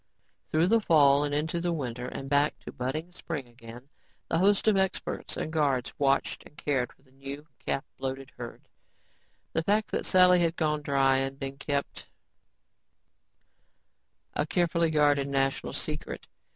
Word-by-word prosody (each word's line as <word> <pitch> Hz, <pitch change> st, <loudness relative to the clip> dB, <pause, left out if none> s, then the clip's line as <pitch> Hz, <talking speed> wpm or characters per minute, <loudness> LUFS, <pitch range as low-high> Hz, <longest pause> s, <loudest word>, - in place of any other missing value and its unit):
Through 160 Hz, +2 st, +3 dB
the 230 Hz, +1 st, +5 dB
fall, 145 Hz, -6 st, +5 dB
into 150 Hz, +3 st, -1 dB
the 175 Hz, -, 0 dB
long 170 Hz, -, 0 dB
winter 125 Hz, -3 st, -4 dB
and 135 Hz, -, -6 dB
back 145 Hz, +2 st, +2 dB
to -, -, -8 dB
budding 155 Hz, +8 st, -4 dB
spring 155 Hz, -6 st, -5 dB
again, 120 Hz, +1 st, -12 dB, 0.4 s
the 165 Hz, -, +2 dB
host 200 Hz, +3 st, +3 dB
of 215 Hz, -, +5 dB
experts 190 Hz, -1 st, -1 dB
and 155 Hz, -, -3 dB
guards 140 Hz, -5 st, +1 dB
watched 135 Hz, -1 st, +1 dB
and 150 Hz, -, -18 dB
cared 135 Hz, -4 st, 0 dB
for -, -, -26 dB
the 130 Hz, -, -26 dB
new 135 Hz, +2 st, -8 dB, 0.2 s
calf 140 Hz, -, -1 dB, 0.2 s
bloated 135 Hz, 0 st, -4 dB
herd. 120 Hz, -1 st, -9 dB, 0.9 s
The 160 Hz, -, +2 dB
fact 210 Hz, +5 st, +1 dB
that -, -, -1 dB
Sally 180 Hz, -1 st, +6 dB
had 165 Hz, -1 st, +1 dB
gone 150 Hz, -2 st, 0 dB
dry 135 Hz, -2 st, +3 dB
had 135 Hz, 0 st, -2 dB
been 135 Hz, 0 st, -5 dB
kept 140 Hz, -1 st, -3 dB, 2.3 s
a -, -, 0 dB
carefully 170 Hz, -1 st, +2 dB
guarded 145 Hz, -2 st, +3 dB
national 135 Hz, -1 st, 0 dB
secret. -, -, -5 dB
145 Hz, 155 wpm, -28 LUFS, 135-165 Hz, 2.3 s, Sally